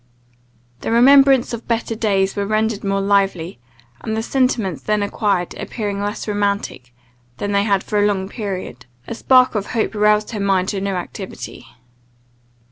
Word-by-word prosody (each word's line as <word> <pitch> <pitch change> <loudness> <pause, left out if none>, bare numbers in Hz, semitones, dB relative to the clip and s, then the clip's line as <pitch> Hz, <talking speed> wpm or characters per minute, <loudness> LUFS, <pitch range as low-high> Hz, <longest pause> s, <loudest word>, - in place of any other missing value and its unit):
The - - -4
remembrance 270 +1 +5
of 235 - -6
better 230 -1 -1
days 195 -4 0
was 200 0 -2
rendered 215 -1 0
more 195 0 0
lively; 195 -5 0 0.4
and 220 0 -4
the 225 - -1
sentiments 230 - 0
then 210 +3 0
acquired 200 -3 -1
appearing 205 -3 -4
less 205 +2 -4
romantic 200 -11 -2 0.5
than 205 - -3
they 200 0 +2
had 200 -3 +1
for 210 - -1
a 205 - +4
long 190 -2 -1
period, 195 - -6 0.2
a - - -4
spark 255 +2 +4
of 210 -2 -2
hope 225 -1 0
roused 210 +1 +2
her 220 - -4
mind 195 -2 +1
to 200 -2 -3
new 195 -1 -2
activity. 180 - -7
205 Hz, 160 wpm, -19 LUFS, 195-220 Hz, 0.5 s, remembrance